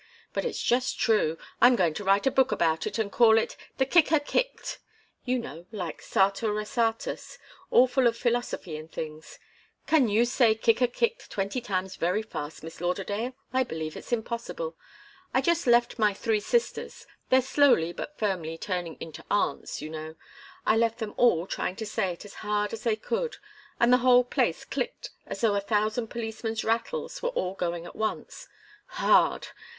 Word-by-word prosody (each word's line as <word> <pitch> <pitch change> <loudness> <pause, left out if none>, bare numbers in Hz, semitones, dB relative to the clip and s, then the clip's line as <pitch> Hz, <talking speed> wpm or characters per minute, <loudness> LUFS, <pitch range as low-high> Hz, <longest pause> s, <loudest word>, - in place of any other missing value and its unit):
But - - -1
it's 485 - -2
just 250 +2 +1
true. 210 -9 +2 0.2
I'm 245 +1 +7
going 175 -7 +2
to 205 - -5
write 195 +1 +3
a 270 - +4
book 265 0 +3
about 160 -1 +1
it - - -3
and 215 -3 -1
call 225 -2 +6
it 225 - 0 0.2
'The 265 - +3
Kicker 320 +1 +4
Kicked' - - -2 0.5
you 255 0 +1
know, 180 -8 -7
like 180 -7 -5
Sartor 200 +3 +1
Resartus 225 +2 -2 0.3
all 250 - +6
full 255 0 +2
of 230 0 0
philosophy 235 -9 -1
and 155 +1 -10
things. 155 0 -7 0.5
Can 300 -6 +4
you 220 +4 +3
say 240 -2 +3
'Kicker 230 +2 +3
Kicked' 465 - -2
twenty 200 +5 -2
times 190 -4 -3
very 180 +6 0
fast, 155 -9 -7
Miss 165 +1 -9
Lauderdale? 200 +7 -2 0.2
I 260 0 +3
believe 160 -8 -5
it's - - -10
impossible. 235 - -3 0.6
I - - +4
just 340 -4 +1
left 240 0 +3
my 210 -2 +3
three 220 +1 0
sisters 470 - -1 0.2
they're 260 - +6
slowly 260 - +3
but 300 - -7
firmly 175 -6 -2
turning 175 -3 -4
into 160 0 -8
aunts, 200 -7 -1
you 155 - -5
know 155 0 -7 0.5
I 220 - +4
left 230 0 +2
them 220 -3 -5
all 180 -9 +4
trying 185 - -3
to 220 - -5
say 200 -3 -1
it 170 - -12
as 205 - -11
hard 210 0 -1
as 225 - -5
they 225 -2 +3
could, 470 - -3 0.4
and 235 +1 +5
the - - +7
whole 250 0 +6
place 245 - 0
clicked - - -4 0.2
as - - -6
though 225 -3 +3
a 200 - +1
thousand 215 +3 0
policemen's 225 -1 -4
rattles 470 - -2
were - - 0
all 190 - -2
going 175 -2 -3
at - - -10
once 220 - -4 0.4
hard! - - +3
220 Hz, 180 wpm, -27 LUFS, 190-245 Hz, 0.6 s, I'm